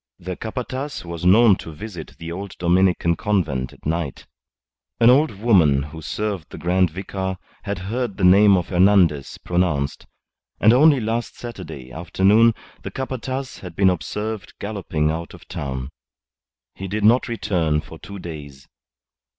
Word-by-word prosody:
The 90 +1 -6
Capataz 130 +4 -5
was 85 0 -6
known 105 +1 +6
to 80 - -9
visit 85 0 -9
the 85 0 -7
old 95 +2 -6
Dominican 90 -1 +2
Convent 80 -13 -1
at - - -19
night. 80 -3 -3 0.7
An 120 +1 +7
old 150 +5 +4
woman 85 - +4
who 75 +2 -9
served 100 -1 -3
the - - -9
Grand 90 +2 +2
Vicar 95 +2 -4 0.3
had 100 -1 -2
heard 105 +3 -3
the - - -3
name 100 +2 +7
of 90 - -3
Hernandez 90 -6 +3
pronounced; 85 -6 -1 0.5
and 110 +2 +6
only 145 +2 +6
last 115 +1 -3
Saturday 70 - -8
afternoon 100 +8 +3 0.3
the - - -6
Capataz 130 0 -5
had 90 -3 -9
been 95 0 +4
observed 105 +4 -4
galloping 90 -7 -2
out 85 +1 -5
of - - -16
town. 65 -1 -5 0.8
He 95 - -7
did 105 +2 -3
not 115 +4 +4
return 85 -9 0
for 80 +1 -10
two 100 - -9
days. 75 -6 -9
95 Hz, 150 wpm, -22 LUFS, 80-110 Hz, 0.8 s, An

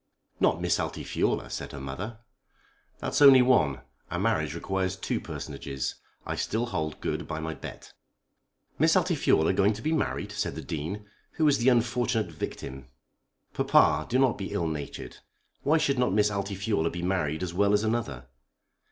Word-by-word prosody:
"Not - - +3
Miss - - +1
Altifiorla?" - - -1
said - - -5
her 70 - -6
mother. 90 - -6 0.8
"That's - - -2
only 135 -3 +9
one. 75 - +3 0.3
A - - -3
marriage - - 0
requires 95 0 -1
two 95 - -2
personages. 70 -1 -5 0.3
I - - -3
still 115 +3 -1
hold 80 -8 -3
good - - -2
by 80 - -4
my 80 0 -3
bet." - - -10 0.9
"Miss - - +4
Altifiorla 80 - +3
going 100 +2 +3
to 105 - -8
be 155 - +1
married!" 155 - -1
said - - -2
the - - -6
Dean. 85 +7 -4 0.3
"Who 155 - +2
is 145 - +4
the 120 +3 +4
unfortunate 120 -4 +1
victim?" 65 -3 -6 0.7
"Papa, 75 0 +3
do 125 - +2
not 130 -5 +3
be 95 - -4
ill 85 - 0
natured. 75 -3 -5 0.4
Why 155 +3 +3
should 140 -4 +1
not 125 -6 +2
Miss 105 0 +3
Altifiorla 100 -3 -1
be 85 +1 -5
married 90 -3 0
as 85 -2 -3
well 100 +2 +3
as 105 +1 +3
another?" 110 - -2
100 Hz, 165 wpm, -28 LUFS, 80-120 Hz, 0.9 s, only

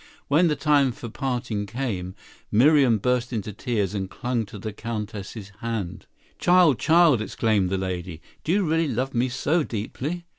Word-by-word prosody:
When 160 +5 +4
the 150 - +1
time 145 -5 +3
for 115 - -8
parting 120 -5 -3
came, 100 -6 -4 0.4
Miriam 130 0 +5
burst 125 +3 0
into 105 -3 -3
tears 105 -3 -1
and 95 -2 -3
clung 120 0 -2
to 105 - -9
the 105 +1 -6
Countess's 105 -2 -6
hand. 110 -6 -4 0.3
"Child! 175 -7 +5
Child!" 160 -7 +5
exclaimed 110 -3 +1
the 95 - 0
lady, 90 -3 -4 0.2
"do 160 - -1
you 200 +2 +3
really 165 -1 +1
love 130 +1 -2
me 125 +1 +1
so 145 +6 +1
deeply?" 145 +8 -4
120 Hz, 160 wpm, -24 LUFS, 105-140 Hz, 0.4 s, Miriam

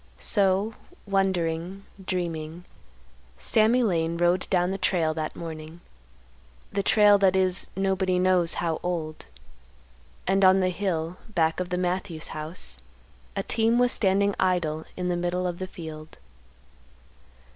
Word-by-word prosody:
So, 200 +1 +3 0.3
wondering, 190 -1 -1 0.2
dreaming, 170 -2 -4 0.7
Sammy 230 +3 +3
Lane 170 -5 0
rode 175 +1 +1
down 180 -1 +2
the 195 - -3
trail 170 -4 +1
that 155 -1 -4
morning—the 65 - -9
trail 205 0 +5
that 190 -1 +4
is 185 -1 +2
nobody 190 -1 +1
knows 180 -2 +2
how 165 -2 -1
old. 165 -3 -4 1.0
And 195 +1 +2
on 190 0 +6
the 185 -1 +2
hill 180 -2 -2
back 165 -5 +1
of 180 -1 -3
the 180 - -1
Matthews 180 -2 -3
house 155 - -5 0.6
a - - -1
team 225 +1 +2
was 245 0 +3
standing 200 0 +2
idle 170 -4 0
in 180 -1 -2
the 175 - 0
middle 175 +1 -1
of 175 -1 -3
the 185 - -4
field. 160 -4 -9
180 Hz, 130 wpm, -26 LUFS, 160-190 Hz, 1.0 s, on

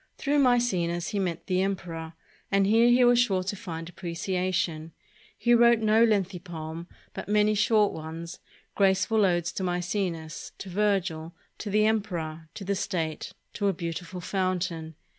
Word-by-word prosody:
Through 290 0 +1
Maecenas 185 -10 +2
he 205 - -2
met 180 -4 -2
the 185 0 +1
emperor, 170 -4 -3 0.4
and 195 0 +3
here 225 +4 +5
he 245 +1 +5
was 245 0 +5
sure 195 -6 +2
to 195 +2 -3
find 165 -4 -6
appreciation. 175 -2 -2 0.4
He 240 - +3
wrote 235 0 +6
no 220 +1 +4
lengthy 195 -5 +1
poem, 165 -1 -7 0.3
but - - -7
many 210 0 +3
short 215 0 +3
ones, 165 +2 -7 0.3
graceful 195 +2 +3
odes 175 -3 +1
to 190 - -4
Maecenas, 175 -3 -3
to 195 - -8
Virgil, 180 -4 -1 0.2
to 210 - -5
the 215 +1 +3
emperor, 170 -8 -2
to 200 - -7
the 200 +1 -1
state, 170 -5 -3 0.2
to 205 - -1
a 195 - +2
beautiful 175 +1 -5
fountain. 180 -4 -2
185 Hz, 155 wpm, -27 LUFS, 170-210 Hz, 0.4 s, wrote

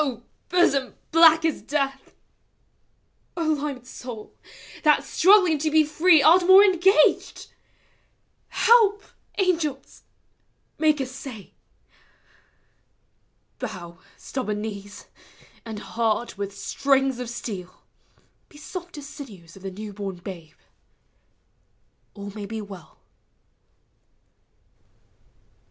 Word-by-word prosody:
hosom 280 -7 +2 0.2
black 325 0 +6
as 320 - -1
death! 275 -2 -3 1.2
O 335 - -1
limed 285 -5 -2
soul, 245 -4 -9 0.5
that, 300 -2 +4
struggling 365 -4 +4
to 310 +2 0
be 310 0 +4
free. 310 +1 +4
Art 350 +5 +6
more 380 +2 +9
engaged! 380 -4 +2 1.0
Help, 430 -3 +4 0.3
angels! 325 -8 -1 0.8
Make 305 -2 +3
assay! 255 -5 -8 2.1
Bow, 175 -8 -7 0.2
stubborn 215 -6 -4
knees; 205 -2 -8 0.6
and 220 -1 -6
heart 220 +4 -2
with 200 0 -6
strings 270 -2 0
of 250 -2 -5
steel, 195 -6 -7 0.7
He 295 - -17
soft 350 +2 -8
as 290 - -8
sinews 200 - -12
of 195 - -14
the 195 - -5
new 205 +2 -8
born 195 -2 -5
babe! 175 -3 -10 1.6
All 200 -1 -8
ma 210 +1 -9
v - - -5
be 220 +1 -5
well. 195 -5 -12
270 Hz, 100 wpm, -24 LUFS, 205-315 Hz, 2.1 s, more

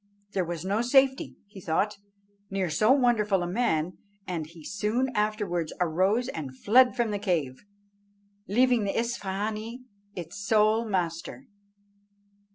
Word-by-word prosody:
There 190 -3 0
was 170 0 -5
no 200 +4 +1
safety, 265 +2 +3
he 200 -1 -12
thought, 200 +6 0 0.5
near 190 -3 -1
so 215 +10 +3
wonderful 220 -8 +3
a - - -2
man, 180 -5 0 0.3
and 165 -4 -4
he 165 -1 -14
soon 215 +6 0
afterwards 210 -6 -1
arose 185 +8 +2
and 135 - -6
fled 250 - +5
from 240 -4 0
the 205 - -2
cave, 160 -10 -1 0.8
leaving 245 +2 +3
the 195 - -1
Isfahânee 220 +1 -3 0.3
its 175 +3 -7
sole 215 +2 +3
master. 180 +4 -3
205 Hz, 130 wpm, -27 LUFS, 175-230 Hz, 0.8 s, fled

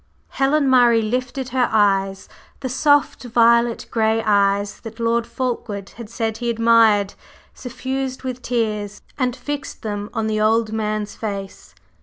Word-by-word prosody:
Helen 280 +1 +1
Murray 240 -3 +5
lifted 250 +3 -3
her 255 -1 +1
eyes 195 -2 +1 0.3
the 260 - -3
soft, 285 +2 +2
violet 235 0 +3
gray 225 0 +1
eyes 200 -1 +1
that 225 0 -10
Lord 230 0 0
Fulkeward 225 -6 -4
had 230 -2 -11
said 225 -1 -3
he 240 -1 -2
admired 225 -3 +4 0.4
suffused 260 +1 -5
with 255 -1 -5
tears, 210 -4 -2 0.2
and 250 -2 0
fixed 285 +2 -6
them 205 -1 -4
on 225 -2 -2
the 215 -1 -1
old 220 0 +2
man's 215 -1 -2
face. 200 -3 -6
230 Hz, 140 wpm, -21 LUFS, 215-250 Hz, 0.4 s, Murray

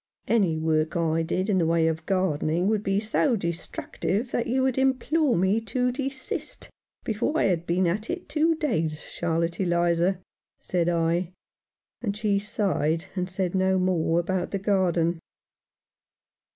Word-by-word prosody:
" - - -67
Any 195 -9 +2
work 155 0 0
I 165 -1 +1
did 185 +4 -1
in 195 -3 +2
the 165 - +2
way 165 0 +3
of 160 0 -1
gardening 180 -2 +1
would 215 -1 +1
be 195 -1 +1
so 225 +4 +1
destructive 190 +5 -3
that 235 - -1
you 260 +2 +1
would 265 -1 +1
implore 265 +2 +2
me 190 +5 +2
to 250 +3 0
desist 270 0 -4 0.3
before 230 +8 -1
I - - +2
had 175 -3 0
been 180 +2 +2
at 200 +6 -1
it 355 +1 -4
two 320 +1 +2
days, 165 - -1
Charlotte 170 0 -2
Eliza," 175 0 +2 0.4
said 175 -1 0
I; 170 +1 0 0.7
and 205 -3 -2
she 210 -2 +1
sighed, 180 -6 0
and 180 -1 -2
said 185 -1 -2
no 190 0 +2
more 175 -3 +1
about 180 +1 -1
the 200 - -2
garden. 175 -4 +1
185 Hz, 155 wpm, -26 LUFS, 170-215 Hz, 0.7 s, way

